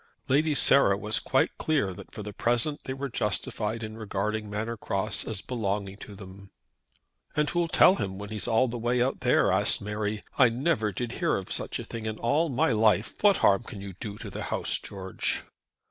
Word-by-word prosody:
Lady 150 +3 +2
Sarah 135 -9 +5
was 105 +2 0
quite - - 0
clear 135 -12 +1
that - - -12
for 105 - -7
the 105 0 -7
present 120 +8 0
they 135 - -3
were 140 +1 -3
justified 110 -1 -2
in 110 0 -6
regarding 105 0 -3
Manor 110 +3 -3
Cross 105 -1 -2
as 110 -4 -3
belonging 100 -5 -3
to 105 -1 -10
them. 95 0 -12 0.9
"And 150 0 +2
who'll 175 -1 +1
tell 185 +3 +6
him 95 -1 -3
when 100 0 -7
he's 110 -1 -3
all 120 +2 +3
the 120 0 -4
way 120 +2 +1
out 130 +2 +1
there?" - - +3
asked - - +2
Mary. 105 0 -3 0.2
"I 125 -3 +7
never 115 -3 0
did 120 +3 -4
hear 170 - +2
of 95 - -7
such - - -3
a - - -5
thing 115 -1 -6
in 110 0 -3
all 145 +9 +1
my 135 +2 +2
life. 110 -1 +3
What 205 -2 +5
harm 100 +2 +5
can 110 -3 -9
you 100 -1 -7
do 105 -3 -6
to - - -8
the - - -5
house, - - 0
George?" 95 -2 -3
110 Hz, 205 wpm, -28 LUFS, 100-125 Hz, 0.9 s, I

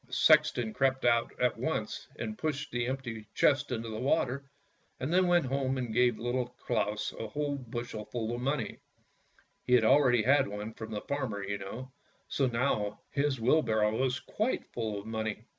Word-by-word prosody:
The - - -15
sexton 110 -3 +4
crept 130 -1 +1
out 115 -1 +3
at 125 -1 +2
once - - -2
and 110 -1 -4
pushed 145 +1 -3
the 120 0 -1
empty 120 -5 -4
chest 145 -1 +3
into 115 -1 -2
the 110 0 -4
water, 135 +1 0 0.5
and 140 +6 -2
then 185 0 +4
went 175 -3 +4
home 135 0 0
and 120 -3 -3
gave 120 -1 +3
Little 120 +1 -1
Claus 105 +1 -1
a 110 - -3
whole 145 +4 -2
bushel 120 -4 -5
full 115 -1 -3
of 120 - -4
money: 135 -3 -2 0.8
he 125 - 0
had 120 -3 +6
already 130 -1 +5
had 140 +3 +4
one 105 +2 -5
from 110 0 -7
the 105 -1 -4
farmer, 130 -8 -3
you 100 0 -3
know, 120 +7 -7 0.4
so 135 - +1
now 115 -4 0
his 140 -2 0
wheelbarrow 110 -4 +3
was 130 +2 0
quite 215 +9 -2
full 110 -3 -2
of 100 - -10
money. 110 -1 -3
120 Hz, 180 wpm, -31 LUFS, 110-135 Hz, 0.8 s, had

